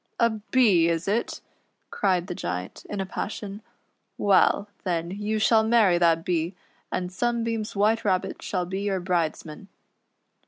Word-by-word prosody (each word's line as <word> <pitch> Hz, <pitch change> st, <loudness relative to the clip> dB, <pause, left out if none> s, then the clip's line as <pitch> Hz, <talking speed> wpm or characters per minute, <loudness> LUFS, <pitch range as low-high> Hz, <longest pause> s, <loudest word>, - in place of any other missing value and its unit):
"A 235 Hz, 0 st, +4 dB
Bee 215 Hz, -5 st, +3 dB
is 165 Hz, +2 st, -1 dB
it.''" 220 Hz, +4 st, -1 dB, 0.5 s
cried 185 Hz, -3 st, +1 dB
the 180 Hz, -, -5 dB
Giant, 90 Hz, -, -5 dB
in 205 Hz, -, -4 dB
a 195 Hz, -, -1 dB
passion; 205 Hz, +1 st, -5 dB, 0.6 s
"well, 200 Hz, 0 st, +3 dB, 0.2 s
then, 170 Hz, -1 st, -2 dB
you 210 Hz, +2 st, -2 dB
shall 220 Hz, +1 st, +4 dB
marry 220 Hz, -6 st, +4 dB
that 165 Hz, -1 st, +3 dB
Bee, 170 Hz, +1 st, -1 dB, 0.4 s
and 180 Hz, 0 st, -2 dB
Sunbeam's 230 Hz, +1 st, -2 dB
White 215 Hz, +3 st, +2 dB
Rabbit 185 Hz, -3 st, -1 dB
shall 180 Hz, -2 st, -2 dB
be 190 Hz, +2 st, -4 dB
your 200 Hz, -2 st, -1 dB
bridesman." 175 Hz, -1 st, -2 dB
195 Hz, 145 wpm, -25 LUFS, 175-215 Hz, 0.6 s, A